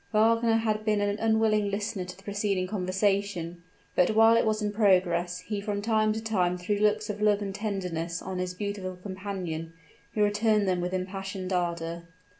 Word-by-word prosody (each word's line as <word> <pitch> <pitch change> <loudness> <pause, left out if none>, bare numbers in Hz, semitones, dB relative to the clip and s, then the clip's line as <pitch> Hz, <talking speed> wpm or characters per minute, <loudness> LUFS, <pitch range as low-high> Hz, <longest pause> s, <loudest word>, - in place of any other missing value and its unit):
Wagner 225 +1 +3
had 215 -1 0
been 215 -1 +2
an 205 +1 0
unwilling 220 -2 +2
listener 205 -1 -3
to 180 0 -9
the 195 - -17
preceding 200 -2 -1
conversation; 185 -2 -1 0.3
but 180 +4 +3
while 225 +1 +7
it 230 - +3
was 215 0 +1
in 210 -1 -1
progress, 180 -4 +2
he 210 -2 -4
from 205 0 -2
time 215 0 +2
to 220 - -3
time 180 -5 +1
threw 200 +3 -1
looks 210 0 +2
of 210 0 -8
love 210 -1 +4
and 200 -2 -4
tenderness 180 -5 -3
on 185 -1 -5
his 180 0 -3
beautiful 200 -2 -4
companion, 180 -4 -5 0.4
who 210 - +3
returned 210 0 +2
them 180 -1 +1
with 180 +1 -2
impassioned 190 0 -4
ardor. 170 -1 -2
200 Hz, 180 wpm, -28 LUFS, 180-215 Hz, 0.4 s, while